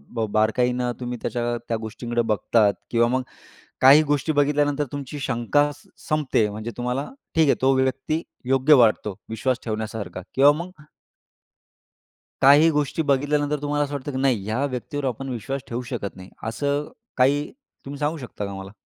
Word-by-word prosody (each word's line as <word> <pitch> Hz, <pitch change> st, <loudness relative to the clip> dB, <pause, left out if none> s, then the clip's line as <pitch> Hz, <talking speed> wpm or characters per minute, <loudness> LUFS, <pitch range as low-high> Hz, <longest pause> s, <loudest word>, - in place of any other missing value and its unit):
बा 115 Hz, -1 st, 0 dB
बारकाईनं 125 Hz, +3 st, +1 dB
तुम्ही 125 Hz, -1 st, -4 dB
त्याच्या 120 Hz, -1 st, -1 dB
त्या 115 Hz, -, 0 dB
गोष्टीकडं 120 Hz, +1 st, -2 dB
बघतात? 105 Hz, -1 st, +3 dB, 0.2 s
किंवा 115 Hz, 0 st, +3 dB
मग 130 Hz, +2 st, 0 dB, 0.6 s
काही 140 Hz, +4 st, +8 dB
गोष्टी 145 Hz, +2 st, 0 dB
बघितल्यानंतर 145 Hz, 0 st, +1 dB
तुमची 145 Hz, 0 st, -6 dB
शंका 135 Hz, +3 st, +1 dB
स 145 Hz, -, -21 dB, 0.2 s
संपते 150 Hz, -8 st, +2 dB
म्हणजे 110 Hz, +3 st, -6 dB
तुम्हाला 125 Hz, +3 st, -2 dB, 0.3 s
ठीक 160 Hz, -2 st, +4 dB
आहे -, -, +4 dB
तो 135 Hz, +1 st, +4 dB
व्यक्ती 130 Hz, +4 st, 0 dB, 0.3 s
योग्य 135 Hz, +3 st, +5 dB
वाटतो 105 Hz, -2 st, +1 dB
विश्वास 115 Hz, +3 st, -1 dB
ठेवण्यासारखा 110 Hz, -4 st, -4 dB
किंवा 140 Hz, +2 st, +7 dB
मग 180 Hz, -, -11 dB, 1.7 s
काही 145 Hz, +4 st, +7 dB
गोष्टी 150 Hz, +1 st, 0 dB
बघितल्यानंतर 145 Hz, +1 st, +1 dB
तुम्हाला 145 Hz, 0 st, 0 dB
असं 145 Hz, -, -8 dB
वाटतं, 145 Hz, 0 st, -4 dB
की 130 Hz, -, -4 dB
"नाही, 130 Hz, -6 st, +1 dB
ह्या 110 Hz, +6 st, -1 dB
व्यक्तीवर 140 Hz, +2 st, -4 dB
आपण 135 Hz, +1 st, -3 dB
विश्वास 130 Hz, +3 st, -4 dB
ठेवू 120 Hz, +1 st, -3 dB
शकत 100 Hz, -5 st, -4 dB
नाही." 95 Hz, 0 st, -12 dB, 0.2 s
असं 145 Hz, +5 st, -1 dB, 0.3 s
काही 140 Hz, +3 st, +2 dB, 0.3 s
तुम्ही 140 Hz, +1 st, -7 dB
सांगू 150 Hz, +2 st, -1 dB
शकता 120 Hz, -6 st, -6 dB
का 100 Hz, -, -6 dB
मला? 95 Hz, 0 st, -8 dB
130 Hz, 160 wpm, -23 LUFS, 115-145 Hz, 1.7 s, काही